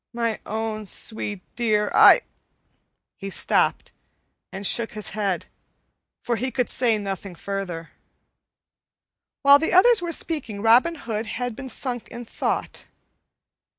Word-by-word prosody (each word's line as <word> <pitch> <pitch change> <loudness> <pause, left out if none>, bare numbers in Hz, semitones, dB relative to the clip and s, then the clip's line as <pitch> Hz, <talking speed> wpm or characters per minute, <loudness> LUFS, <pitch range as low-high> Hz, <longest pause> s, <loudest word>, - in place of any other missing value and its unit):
My 230 -2 -2
own 220 -1 -4
sweet 205 -1 -5
dear, 215 -3 +1
I - - +8 0.5
" - - -49
He 195 - -5
stopped - - 0 0.6
and 195 +1 -6
shook 230 +3 +2
his 215 -1 -4
head, 200 -3 -2 0.8
for 235 -1 -1
he 260 +3 -2
could 250 0 -2
say 235 -4 +1
nothing 195 -2 -6
further. 180 -3 -5 1.5
While 280 0 +8
the 320 - -1
others 430 +4 +6
were 345 -1 -3
speaking, 290 -12 0
Robin 245 +9 +4
Hood 225 -6 -5
had 245 +1 -4
been 265 +1 -7
sunk 245 -1 -3
in 240 0 -9
thought. - - -3
225 Hz, 130 wpm, -23 LUFS, 205-250 Hz, 1.5 s, I